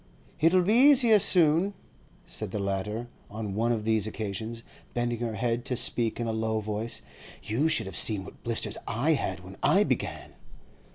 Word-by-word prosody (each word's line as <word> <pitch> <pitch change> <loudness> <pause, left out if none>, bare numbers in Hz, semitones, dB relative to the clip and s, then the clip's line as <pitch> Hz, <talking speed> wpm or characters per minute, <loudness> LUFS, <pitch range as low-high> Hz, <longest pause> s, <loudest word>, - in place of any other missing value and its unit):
'It'll 175 +3 +4
be 205 +5 +2
easier 245 -4 +6
soon,' 175 +2 +4 0.5
said - - -5
the 100 - -4
latter, 100 +4 -3 0.2
on 105 -1 -5
one 115 +4 0
of 110 -3 -1
these 110 -2 +1
occasions, 110 +2 -5 0.3
bending 120 -1 -1
her 115 -2 -3
head 120 +2 -1
to 125 - -3
speak 115 0 0
in 120 - -2
a 115 - -2
low 110 0 -1
voice. 110 +2 -4 0.4
'You 130 +9 0
should 160 - +3
have 95 -2 -8
seen 105 -4 +3
what - - -14
blisters 115 -2 -2
I 125 +8 0
had 95 - -2
when 95 +1 -12
I - - +4
began. - - -3
115 Hz, 175 wpm, -27 LUFS, 105-145 Hz, 0.5 s, easier